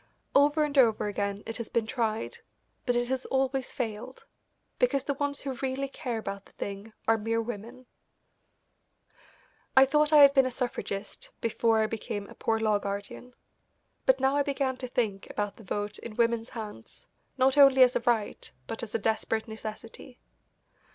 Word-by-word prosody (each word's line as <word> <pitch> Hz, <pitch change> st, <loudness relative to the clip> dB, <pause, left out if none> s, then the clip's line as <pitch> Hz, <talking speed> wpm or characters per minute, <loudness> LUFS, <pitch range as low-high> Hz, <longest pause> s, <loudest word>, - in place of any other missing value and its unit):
Over 290 Hz, +2 st, +4 dB
and 295 Hz, -1 st, -2 dB
over 225 Hz, -5 st, +4 dB
again 200 Hz, 0 st, -2 dB
it 225 Hz, -, -4 dB
has 235 Hz, -2 st, -6 dB
been 230 Hz, -2 st, 0 dB
tried, 230 Hz, -, -2 dB, 0.5 s
but 245 Hz, -, +2 dB
it 240 Hz, 0 st, +1 dB
has 260 Hz, 0 st, -2 dB
always 265 Hz, 0 st, 0 dB
failed, 235 Hz, 0 st, -5 dB, 0.5 s
because 280 Hz, -, +2 dB
the 280 Hz, -, -1 dB
ones 285 Hz, 0 st, -3 dB
who 275 Hz, -2 st, -3 dB
really 270 Hz, +1 st, -2 dB
care 250 Hz, -3 st, -4 dB
about 200 Hz, -2 st, -5 dB
the -, -, -21 dB
thing 200 Hz, +2 st, -6 dB, 0.2 s
are 225 Hz, 0 st, +4 dB
mere 225 Hz, +2 st, 0 dB
women. 235 Hz, +2 st, -6 dB, 1.9 s
I 265 Hz, -, +9 dB
thought 300 Hz, +2 st, +2 dB
I 300 Hz, -2 st, +9 dB
had 280 Hz, 0 st, +8 dB
been 270 Hz, -2 st, +5 dB
a -, -, -1 dB
suffragist 235 Hz, -5 st, -4 dB
before 225 Hz, -1 st, +2 dB
I -, -, +2 dB
became 205 Hz, -2 st, -4 dB
a -, -, -9 dB
Poor 225 Hz, 0 st, 0 dB
Law 215 Hz, -2 st, +2 dB
Guardian, 200 Hz, +5 st, -6 dB, 0.7 s
but 260 Hz, 0 st, +5 dB
now 265 Hz, +1 st, +2 dB
I 285 Hz, -, +3 dB
began 275 Hz, -2 st, -1 dB
to 255 Hz, -, -5 dB
think 215 Hz, -6 st, -2 dB
about 205 Hz, -1 st, -3 dB
the 225 Hz, -, -13 dB
vote 205 Hz, +1 st, -3 dB
in 225 Hz, -2 st, -8 dB
women's 235 Hz, 0 st, +1 dB
hands 215 Hz, -3 st, -9 dB, 0.3 s
not 260 Hz, +1 st, +4 dB
only 275 Hz, -2 st, +8 dB
as 250 Hz, 0 st, +3 dB
a -, -, +3 dB
right 230 Hz, -3 st, -1 dB
but 225 Hz, -, -5 dB
as 230 Hz, -2 st, -6 dB
a -, -, +4 dB
desperate 220 Hz, +1 st, -1 dB
necessity. 220 Hz, +2 st, -9 dB
235 Hz, 175 wpm, -28 LUFS, 215-265 Hz, 1.9 s, I